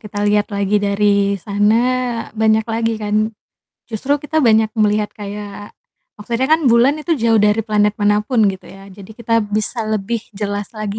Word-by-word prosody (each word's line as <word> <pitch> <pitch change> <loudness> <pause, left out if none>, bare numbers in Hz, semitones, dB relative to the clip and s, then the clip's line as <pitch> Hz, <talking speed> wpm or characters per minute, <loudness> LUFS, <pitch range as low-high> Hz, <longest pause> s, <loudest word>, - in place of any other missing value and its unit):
kita 205 -1 -4
lihat 205 +1 +1
lagi 200 +1 0
dari 200 0 +1
sana, 210 +4 +1 0.5
banyak 220 0 +2
lagi 225 0 -1
ka. 210 - -4 0.8
Justru 260 +6 -1
kita 315 +1 -2
banyak 220 -1 +4
melihat 210 0 +1
kayak 205 0 -8 0.5
maksudnya 235 +5 -2
kan 315 -2 +3
bulan 250 +6 +4
itu 335 - 0
jauh 225 -1 +3
dari 210 +2 +2
planet 210 -1 +2
manapun 210 +2 +1
gitu 190 -1 -10
ya, 195 0 -13
jadi 190 0 -13
kita 230 0 0
bisa 215 +2 -2
lebih 215 +2 -2 0.2
jelas 205 0 -4
lagi 215 -1 -4
210 Hz, 160 wpm, -18 LUFS, 205-225 Hz, 0.8 s, banyak